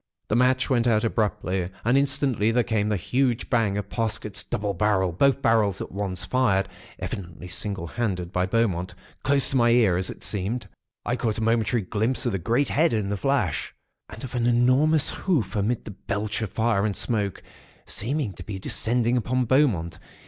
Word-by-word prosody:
"The 105 - +1
match 125 +1 +3
went 120 -3 +2
out, 110 -2 +3
abruptly, 95 -5 -1 0.2
and 120 +3 +3
instantly 140 -5 +2
there 120 +1 +2
came 105 -2 0
the 105 - +1
huge 125 +5 -1
bang 110 -5 +2
of 105 - -3
Parsket's 110 -3 -2
double 100 -1 -2
barrel 95 -2 +1
(both 135 +10 +2
barrels 105 -4 +2
at - - -6
once), 95 -2 -3
fired 100 -7 +1 0.3
(evidently 90 -2 -6
single 95 0 -3
handed 90 -3 -3
by 90 0 +1
Beaumont) 95 -4 0 0.3
close 140 0 +3
to 135 - +1
my 120 -1 +4
ear, 115 -7 +4
as 95 - -1
it - - -9
seemed. 105 +4 -1 0.4
I 120 - 0
caught 115 -4 -1
a 115 - -2
momentary 115 0 +1
glimpse 110 +8 0
of 120 - +1
the 95 - -2
great 120 +10 +1
head, 160 0 +2
in 105 -3 -1
the 100 - -1
flash, 105 - -1 0.3
and 110 +1 -9
of 130 - -7
an 120 -1 0
enormous 130 +6 +3
hoof 125 - -1
amid 105 +3 -1
the - - -7
belch 105 +3 -3
of 110 - -2
fire 110 -2 +1
and 105 -2 -1
smoke, 105 -5 -1 0.4
seeming 130 -1 -2
to - - -10
be 100 -2 -6
descending 120 +5 +1
upon 125 +2 0
Beaumont. 110 - +1
110 Hz, 185 wpm, -25 LUFS, 100-125 Hz, 0.4 s, my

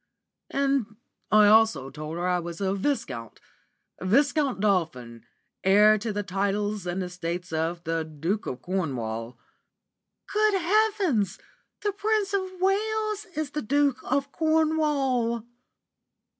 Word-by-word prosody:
"And 275 -6 0 0.3
I 215 0 +6
also 215 -10 +4
told 155 +2 -6
her 175 +1 -1
I 180 0 +2
was 170 -1 -6
a 195 -1 0
Viscount, 195 - -3 0.6
Viscount 275 - +2
Dolphin, 155 - -1 0.4
heir 210 +3 +6
to 220 +1 -3
the 205 0 -2
titles 200 +1 -1
and 180 +2 -2
estates 175 -1 -5
of 165 +2 -1
the 165 -1 -1
Duke 160 +7 -3
of 125 0 -5
Cornwall." 125 -11 -3 1.0
"Good 425 -1 +3
heavens! 365 - +1 0.5
The 410 - +1
Prince 415 0 0
of 375 -2 -2
Wales 425 +2 0
is 305 -2 -2
the 300 - -3
Duke 280 +2 +1
of 275 +1 -1
Cornwall!" 295 -8 +1
215 Hz, 120 wpm, -26 LUFS, -, 1.0 s, I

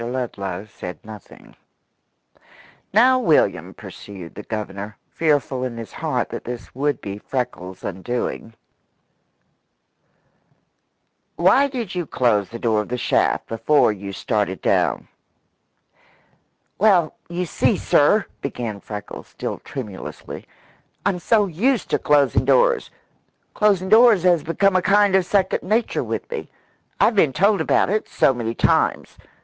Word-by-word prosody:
Ludlow 110 -6 -4
said 90 -5 -8
nothing. 105 -3 -13 1.4
"Now, 255 +5 +5
William," 165 -11 +1
pursued 95 -5 -10
the 105 - -8
Governor, 105 -1 -6
fearful 145 -5 0
in 125 -2 -4
his 115 -2 -8
heart - - -2
that - - -6
this 120 0 -7
would 140 0 -1
be 100 0 -6
Freckles' 105 -8 -5
undoing, 115 +3 -4 2.8
"why 200 +11 +4
did 245 -8 -5
you 175 -3 -3
close 105 -7 +1
the 115 - -7
door 110 -2 +1
of 105 - -8
the 125 - -2
shaft 120 - +1
before 115 +3 +2
you 100 -1 -7
started 100 -2 -2
down?" - - 0 1.7
"Well, 190 -7 +4 0.2
you 175 +1 -2
see, - - +1
sir," - - +3 0.2
began 110 -4 -4
Freckles, 105 0 -8
still - - -5
tremulously, 105 -9 -8 0.6
"I'm 190 -3 +1
so 210 +3 +3
used 210 - 0
to - - +2
closin' 145 -3 +3
doors. 485 -1 +3 0.6
Closin' 200 -3 +2
doors 220 -3 +6
has 175 -3 +4
become 185 +5 +1
a 185 - +4
kind 200 0 +3
of 185 -2 +2
second 195 -2 +1
nature 215 +6 0
with - - -4
me. 475 - -5 0.5
I've - - +4
been 155 -9 +3
told 200 +3 +3
about 160 - +2
it 215 +1 -1
so 135 - +3
many 115 -2 -4
times. - - +1
140 Hz, 130 wpm, -21 LUFS, -, 2.8 s, doors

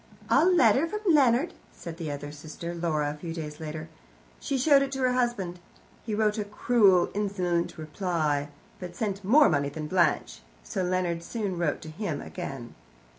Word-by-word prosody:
"A - - +6
letter 345 -4 +4
from 420 -1 0
Leonard!" 275 +3 +4 0.2
said 165 -1 -9
the 165 -3 -4
other 145 0 -5
sister, 155 +3 -7
Laura, 155 -4 -1
a 150 - -10
few 165 0 -6
days 150 -2 -6
later. 155 0 -6 0.5
She 275 - -2
showed 275 +1 +5
it 275 -1 -1
to 270 - -3
her 255 -1 +2
husband. 240 -8 -1 0.4
He 220 -2 -3
wrote 215 0 +1
a - - 0
cruel 205 -3 +3
insolent 185 -5 -1
reply, 155 -3 -1 0.3
but 180 -2 -7
sent 200 -3 -3
more 280 +10 +6
money 140 0 +1
than 155 +2 -6
Blanche, 155 - +1 0.2
so - - -3
Leonard 180 -2 0
soon 200 0 -3
wrote 170 -4 -1
to 160 - -8
him 200 +7 -4
again. 135 -9 -7
180 Hz, 175 wpm, -27 LUFS, 155-225 Hz, 0.5 s, A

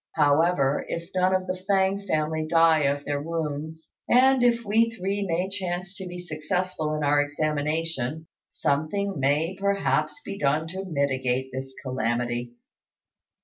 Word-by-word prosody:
However, 145 -1 +3
if 170 0 -5
none 185 0 +3
of 185 0 -1
the 185 0 -4
Fêng 195 0 +2
family 155 -1 0
die 165 -2 +4
of 140 +1 0
their 145 -1 -1
wounds, 160 0 -4 0.2
and 260 +1 +5
if 235 -1 +3
we 225 +3 +3
three 200 -2 -3
may 180 0 0
chance 190 -1 -4
to 190 - -6
be 180 0 -7
successful 160 -1 -2
in 155 - -2
our 145 0 +4
examination, 155 0 -2 0.2
something 165 +6 -1
may 150 +7 +1
perhaps 155 -6 0
be 200 - -6
done 150 +3 +1
to 190 +2 -5
mitigate 130 -5 -1
this 130 0 -6
calamity." 120 -1 -2
160 Hz, 145 wpm, -26 LUFS, 145-185 Hz, 0.2 s, and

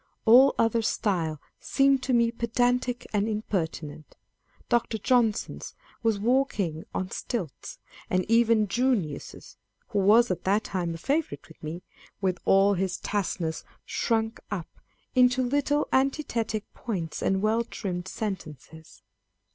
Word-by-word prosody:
All 255 +5 +7
other 230 0 +2
style 175 -9 -1 0.2
seemed 275 -1 +2
to 260 - -2
me 235 -1 +3
pedantic 245 +1 0
and 205 0 +1
impertinent. 160 -8 -4 0.5
Dr. 240 -2 +1
Johnson's 225 -1 0 0.3
was 225 -3 +1
walking 210 - 0
on 185 0 -3
stilts; 185 - -5 0.3
and 185 0 +1
even 230 -1 +4
Junius's 215 - -2 0.3
(who 210 -4 0
was 215 +3 +5
at 175 -1 -3
that 200 +3 +2
time 175 -3 -3
a - - -6
favourite 295 - -2
with 160 - -17
me), 160 +4 -6 0.4
with 185 -3 0
all 195 +1 +5
his 185 -1 -1
terseness, 180 -5 -2 0.2
shrunk 225 -1 -1
up 185 -5 -4 0.4
into 250 0 +4
little 285 +3 +1
antithetic 260 -6 0
points 180 -9 -4
and 190 +1 +1
well 225 +2 +2
trimmed 185 -6 -5
sentences. 160 -6 -7
215 Hz, 125 wpm, -27 LUFS, 185-240 Hz, 0.5 s, All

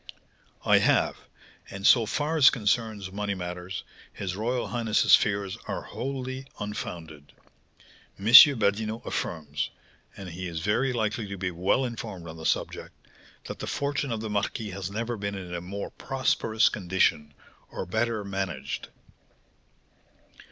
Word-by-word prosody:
"I - - +6
have; - - +3 0.5
and, 100 0 -6
so 115 -2 +6
far 150 +6 -1
as 145 -5 +8
concerns 110 -4 -1
money 100 0 -2
matters, 90 +1 -5 0.3
his 90 -2 -4
royal 115 +1 -1
highness's 115 -1 +2
fears 100 -2 -1
are - - -3
wholly 130 0 -5
unfounded. 80 -7 -6 0.8
M. 100 - -9
Badinot 110 -3 +7
affirms 75 -3 -3 0.5
(and 95 -2 -7
he 90 +2 -6
is 85 -2 -4
very 115 +8 +1
likely 110 -2 -1
to 100 0 -6
be 90 -1 -2
well 95 +10 +1
informed 110 -7 -6
on 80 0 -8
the 80 - -3
subject) - - -2 0.5
that - - -7
the - - -5
fortune 140 -1 -1
of 110 -2 -2
the 110 - -4
marquis 105 +1 -2
has 95 0 -5
never 115 +3 -3
been 100 0 -3
in 90 -2 -7
a 85 - -3
more 100 +3 -6
prosperous 125 -4 +1
condition, 85 -6 0 0.3
or - - -5
better 110 +3 -1
managed." 95 -9 -4
100 Hz, 140 wpm, -27 LUFS, 90-115 Hz, 0.8 s, as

